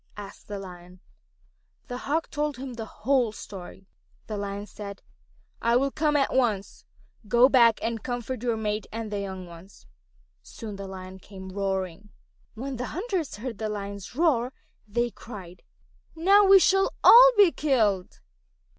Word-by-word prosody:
asked 200 -1 -10
the 205 - -5
Lion. 180 -1 -11 0.9
The 245 -1 -5
Hawk 320 +3 0
told 295 -2 -2
him 260 0 -6
the 225 -2 -6
whole 250 0 +1
story. 195 -2 -10 0.4
The 215 - -5
Lion 200 0 -4
said: 200 -2 -9 0.6
"I 235 +1 +2
will 275 +2 +2
come 300 0 0
at 280 -2 +2
once. 220 -7 -1 0.4
You 210 - -19
go 240 +3 +6
back 235 -4 +5
and 225 -1 -2
comfort 245 0 -4
your 235 -2 0
mate 210 -1 -2
and 225 -1 -5
the 205 - -2
young 190 -2 -6
ones." 170 +3 -14 0.6
Soon 215 -4 -9
the 195 0 -7
Lion 190 0 -9
came 190 -1 -11
roaring. 190 0 -3 0.5
When 260 +3 -5
the 250 +1 -4
hunters 375 - -2
heard 225 +1 -6
the 220 -1 -2
Lion's 200 0 -6
roar 265 -6 +2 0.3
they 240 +3 -1
cried, 190 -8 -11 0.5
"Now 395 +5 +5
we 390 0 +8
shall 385 +1 +3
all - - +10
be 400 -4 +7
killed." 220 - 0
220 Hz, 155 wpm, -26 LUFS, 200-265 Hz, 0.9 s, all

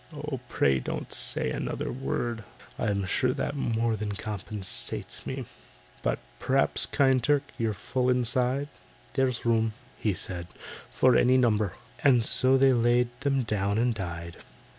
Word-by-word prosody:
"Oh, 150 -3 -5
pray 70 - +3
don't - - -5
say - - -1
another - - -3
word, 120 -3 -2 0.4
I'm 100 -2 0
sure 125 +7 +1
that 145 - -2
more 115 -4 0
than 105 -1 -3
compensates 100 -1 -4
me. - - -4 0.6
"But - - 0 0.2
p'r'aps, 135 +1 +1
kind 135 -4 +3
Turk, 145 +1 +3 0.2
you're 110 -2 0
full 125 +5 -1
inside?" 125 +3 +1 0.4
"There's 130 -3 0
room," 115 -1 +2 0.4
said 90 -2 -2
he, - - -24 0.3
"for 130 -1 +4
any 130 +1 +5
number." 110 -6 +2 0.3
And 125 -5 +5
so 130 +3 +3
they 135 0 +5
laid 120 0 +3
them 135 -1 +1
down 100 -2 0
and 120 +1 +2
died. 85 -4 -6
120 Hz, 140 wpm, -28 LUFS, 105-130 Hz, 0.6 s, any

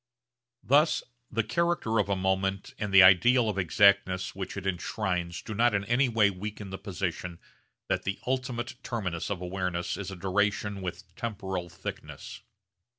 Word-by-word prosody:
Thus 150 +4 +3 0.3
the 115 0 0
character 120 -3 0
of 100 -1 +1
a 100 - +2
moment 95 +1 -1
and 105 -2 -2
the 95 -1 +9
ideal 110 +7 +6
of 100 -2 -1
exactness 95 0 +3
which 95 0 -6
it 100 - -5
enshrines 90 -2 -2
do 110 - -6
not 115 +1 +3
in 100 0 -1
any 125 +4 +2
way 110 -3 +3
weaken 100 +1 -7
the 95 - -6
position 90 -2 -4 0.5
that - - 0
the 95 - -3
ultimate 125 -1 -2
terminus 95 -10 -3
of 100 -3 -3
awareness 90 -1 -2
is 100 -2 -5
a 95 - -6
duration 100 +2 0
with 90 0 -7
temporal 95 -6 -4
thickness. - - -8
100 Hz, 155 wpm, -28 LUFS, 95-110 Hz, 0.5 s, the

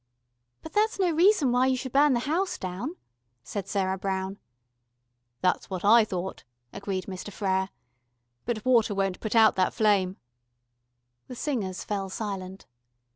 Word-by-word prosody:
"But 320 - -9
that's 435 +1 +2
no 370 -3 +2
reason 330 - +4
why 250 +1 +3
you 260 -1 +2
should 260 0 -5
burn 285 0 +5
the 240 - +1
house 340 +8 -1
down," 190 - -5 0.5
said 195 +7 -5
Sarah 190 -1 -1
Brown. 190 +1 -3 1.0
"That's 180 0 +1
what 185 0 -4
I 225 +2 +7
thought," 185 -2 -5 0.3
agreed 195 -2 -4
Mr. 190 +1 -7
Frere. 190 -2 0 0.8
"But 230 -2 -2
water 230 -5 +3
won't 195 -1 -1
put 220 +1 -3
out 220 -1 +7
that 185 - +1
flame." 200 -4 +2 1.1
The 250 - -8
singers 225 - -3
fell 195 -2 -3
silent. 190 -2 -5
205 Hz, 145 wpm, -27 LUFS, 190-255 Hz, 1.1 s, I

